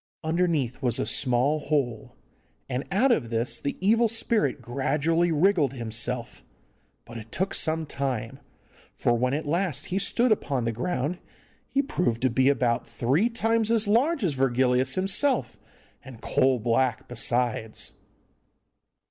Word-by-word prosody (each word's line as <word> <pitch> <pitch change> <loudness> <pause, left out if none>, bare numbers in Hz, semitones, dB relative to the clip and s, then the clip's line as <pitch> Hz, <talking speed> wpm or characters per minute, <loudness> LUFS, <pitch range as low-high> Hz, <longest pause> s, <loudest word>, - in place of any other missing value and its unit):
Underneath 160 -6 0
was 120 -4 +1
a - - -1
small 130 +4 +1
hole, 140 -7 -2 0.5
and 130 +1 -3
out 245 +8 +3
of 135 - +1
this 115 0 -1
the 140 - -4
evil 225 +5 +3
spirit 225 -6 0
gradually 150 +7 0
wriggled 160 -4 +2
himself; 115 0 -4 0.6
but 115 0 -8
it 110 +1 -12
took 190 +1 -1
some 160 0 +1
time, 135 -3 -4 0.6
for 120 - +1
when 125 +3 0
at 155 - -3
last 155 -2 -1
he 195 - +1
stood 235 +5 +2
upon 135 - 0
the 115 - 0
ground 145 +6 -2 0.5
he 275 - +1
proved 175 - -1
to 130 - +3
be 130 +3 +3
about 125 -4 0
three 145 - +1
times 225 -1 0
as 225 -2 +2
large 250 +7 +2
as 170 -6 +1
Virgilius 130 0 +1
himself, 195 +9 0 0.4
and 130 -4 -11
coal 130 +2 +2
black 120 +1 0
besides. 120 -2 -1
140 Hz, 140 wpm, -26 LUFS, 120-185 Hz, 0.6 s, out